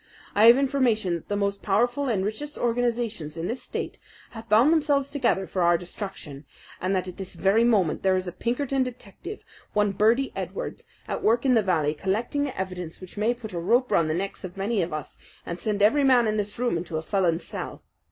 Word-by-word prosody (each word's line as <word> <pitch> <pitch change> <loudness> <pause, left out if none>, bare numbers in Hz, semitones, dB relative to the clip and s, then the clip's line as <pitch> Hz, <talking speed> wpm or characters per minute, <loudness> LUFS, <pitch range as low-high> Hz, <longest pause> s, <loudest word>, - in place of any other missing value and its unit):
I 210 +2 +6
have 235 +2 +9
information 255 -9 +1
that 170 - -5
the 205 - -1
most 200 0 -1
powerful 245 +7 +1
and 195 -5 0
richest 290 +8 -4
organizations 230 -9 -1
in 165 - -3
this 235 +7 -3
state - - -5 0.3
have 225 -1 -10
bound 235 +9 +6
themselves 285 -3 +1
together 245 -9 +1
for 185 - -3
our 170 0 +4
destruction, 175 -5 -7 0.4
and 185 +2 0
that 185 0 -1
at 180 - -8
this 190 -2 -7
very 195 +6 +3
moment 205 -9 +2
there 190 -1 +3
is 185 0 -1
a - - -3
Pinkerton 265 +7 -1
detective, 250 - -6 0.3
one 210 -1 +2
Birdy 225 +7 +2
Edwards, - - -5 0.2
at - - -3
work 235 +4 +2
in 260 - +4
the 225 - +5
valley 160 -7 +1
collecting 220 - -1
the 265 -8 -6
evidence 180 -3 -5
which 185 -1 -11
may 220 +4 +1
put 220 -4 -9
a 170 - -2
rope 240 +9 +2
round 165 -2 +3
the 155 - 0
necks 195 +3 -4
of 185 0 -8
many 205 +2 0
of 170 - -2
us, 155 -2 -6 0.3
and 170 +1 -5
send 205 +1 0
every 280 +8 +4
man 255 -3 +5
in 215 -1 0
this 205 0 -3
room 245 -7 0
into 170 -1 -4
a 160 - -4
felon's 175 -2 +1
cell. - - -6
210 Hz, 215 wpm, -26 LUFS, 185-245 Hz, 0.4 s, have